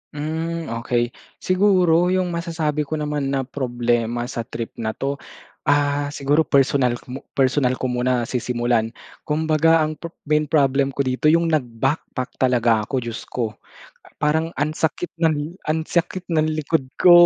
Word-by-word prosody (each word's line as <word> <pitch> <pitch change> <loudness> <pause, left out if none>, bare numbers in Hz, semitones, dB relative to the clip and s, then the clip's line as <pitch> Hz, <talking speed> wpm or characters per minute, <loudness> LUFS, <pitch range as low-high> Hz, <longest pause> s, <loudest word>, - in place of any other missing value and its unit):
Hmm, 160 +1 -3
okey. 120 0 0 0.2
Siguro 185 -3 +3
yung 185 -1 +1
masasabi 160 -3 -2
ko 155 - -2
naman 150 -2 -2
na 135 -1 0
problema 120 -3 -1
sa 120 -2 -5
trip 115 -2 -5
na 110 -1 -2
'to, 140 +1 -2 0.5
ah, 145 0 +2
siguro 145 +3 +2
personal 135 -3 +3
k 125 - -12
mo 130 - -5 0.2
personal 130 -1 +2
ko 130 0 -2
muna 125 0 +1
sisimulan. 120 -1 0 0.4
Kumbaga 160 +1 +3
ang 155 -1 -3
pep 170 0 -8
main 150 0 +1
problem 140 -2 +2
ko 140 - +1
dito 130 +3 0
yung 165 +1 +4
nag-backpack 130 -1 -2
talaga 120 -4 +3
ako, 130 -2 -1
Diyos 115 -1 -6
ko. 115 -3 -2 0.6
Ah, - - -22
parang 160 +2 +1
ang 145 +2 0
sakit 160 +2 -2
ng 160 +1 0
ang 160 +1 +1
sakit 175 +2 -2
ng 155 -1 +2
likod 155 -2 0
ko, 180 - +6
145 Hz, 155 wpm, -22 LUFS, 125-160 Hz, 0.6 s, ko